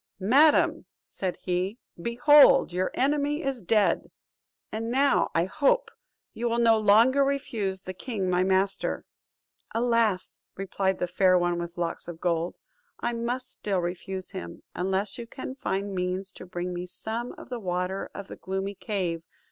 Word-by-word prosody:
"Madam," 300 +2 +5 0.2
said 185 -2 -4
he, 185 +4 -1 0.2
"behold 270 - +6
your 185 +1 0
enemy 290 +3 +1
is 270 -3 -2
dead; 210 +2 +2 0.6
and 225 +1 -3
now, 275 +3 +3
I 165 +1 +3
hope, 310 - +1 0.4
you 235 +1 -1
will 230 - 0
no 230 -2 +5
longer 230 +7 +5
refuse 220 -9 -2
the 185 - -6
king 200 -1 -3
my 180 0 +2
master." 190 +1 +1 0.7
"Alas!" 230 -5 +1 0.2
replied 190 0 -1
the - - 0
Fair 185 +1 +3
One 175 -1 +1
with 170 0 -6
Locks 170 -1 -3
of 170 -2 -7
Gold, 170 0 -1 0.4
"I 240 - -1
must 245 +2 -3
still 200 -2 -2
refuse 185 +2 -4
him, 85 0 -8
unless 190 +4 -1
you 235 - -6
can 260 +1 -7
find 200 -6 -3
means 185 +1 -2
to 185 - -11
bring 180 0 -4
me 175 +1 -5
some 230 +6 -5
of - - -12
the 245 -2 -4
water 180 0 -2
of 200 -1 -7
the - - -9
gloomy 190 +1 -3
cave. 185 -5 -2
195 Hz, 155 wpm, -27 LUFS, 180-235 Hz, 0.7 s, behold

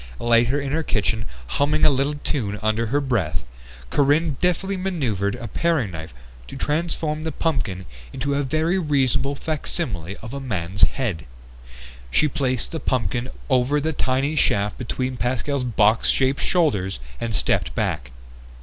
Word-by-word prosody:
Later 120 +3 +3
in 140 -1 -3
her 160 +3 +1
kitchen, 110 -4 0 0.2
humming 145 - +2
a - - +7
little 140 +2 +1
tune 105 -7 -1
under 110 +1 +1
her 140 +6 +2
breath, 95 - -1 0.5
Corinne 145 +2 +3
deftly 185 +2 +1
maneuvered 130 - -1
a 120 -1 -6
paring 150 - +1
knife 80 -1 -7 0.4
to - - -8
transform 155 +1 -1
the 160 - -2
pumpkin 125 - -1 0.3
into 140 - -2
a 140 - +1
very 155 +6 +1
reasonable 140 -3 +1
facsimile 125 - -2
of 115 +3 -9
a 140 - -3
man's 95 -7 -3
head. 105 - -3 0.8
She 150 - +3
placed 130 -4 -1
the 165 - -3
pumpkin 125 -1 -1 0.2
over 130 +2 +3
the 160 +2 -1
tiny 135 +3 0
shaft 100 -8 +1
between 125 +1 -2
Pascal's 130 +3 -1
box 110 -2 +3
shaped 135 +1 +2
shoulders 105 - +1 0.2
and 115 -2 -1
stepped - - +1
back. 65 -4 -1
130 Hz, 150 wpm, -23 LUFS, 110-150 Hz, 0.8 s, a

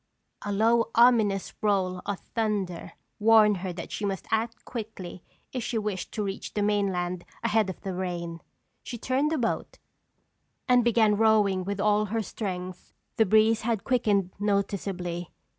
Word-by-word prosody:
A 205 - -4
low, 230 +3 +3
ominous 225 -5 +4
roll 190 -4 +1
of 205 -2 -3
thunder 205 -6 -2 0.3
warned 215 -1 +6
her 185 0 -4
that 170 -1 -7
she - - -4
must 195 -2 -2
act 225 +1 -1
quickly 210 -7 -7 0.3
if 250 -2 -2
she 235 - -2
wished 210 -3 -3
to 215 - -2
reach 195 -1 -5
the 205 - +1
mainland 185 -4 0 0.2
ahead 220 -3 +2
of 185 - -6
the 190 - -4
rain. 175 -2 -4 0.4
She 240 - -7
turned 260 +6 0
the 320 - +1
boat, 250 - -2 0.9
and 250 -2 +5
began 220 -3 +3
rowing 210 -4 +3
with 200 0 -3
all 210 +1 +3
her 220 +2 -2
strength. 185 -3 -6 0.2
The 220 - +4
breeze 220 +2 +4
had 225 -3 -1
quickened 210 -7 +1
noticeably. 195 -4 -2
205 Hz, 155 wpm, -27 LUFS, 185-225 Hz, 0.9 s, warned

